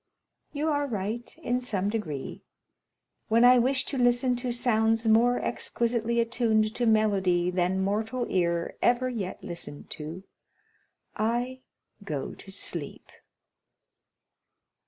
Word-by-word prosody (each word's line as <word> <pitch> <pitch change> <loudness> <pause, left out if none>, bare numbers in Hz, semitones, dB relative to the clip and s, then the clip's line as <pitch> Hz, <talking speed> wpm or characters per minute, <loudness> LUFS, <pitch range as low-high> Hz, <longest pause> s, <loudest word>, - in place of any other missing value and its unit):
30097m - - -4
"You 305 +2 0
are 290 -1 0
right, 220 +1 -4
in 250 +1 0
some 200 -6 -1
degree; 165 -11 -4 0.8
when 230 +2 +5
I 250 0 +7
wish 255 +2 +2
to 270 - -3
listen 245 +1 +3
to 245 0 -2
sounds 225 -1 +1
more 235 +3 +4
exquisitely 235 0 -1
attuned 220 -2 +1
to 240 -1 0
melody 190 -5 +2
than 180 +1 +1
mortal 220 +5 -1
ear 170 -2 0
ever 245 +1 +3
yet 205 -7 -5
listened 170 -4 -7
to, 160 +4 -6 0.9
I 240 +4 -1 0.4
go 150 -9 -4
to 195 - -12
sleep." 170 -6 -5
225 Hz, 120 wpm, -27 LUFS, 190-245 Hz, 0.9 s, I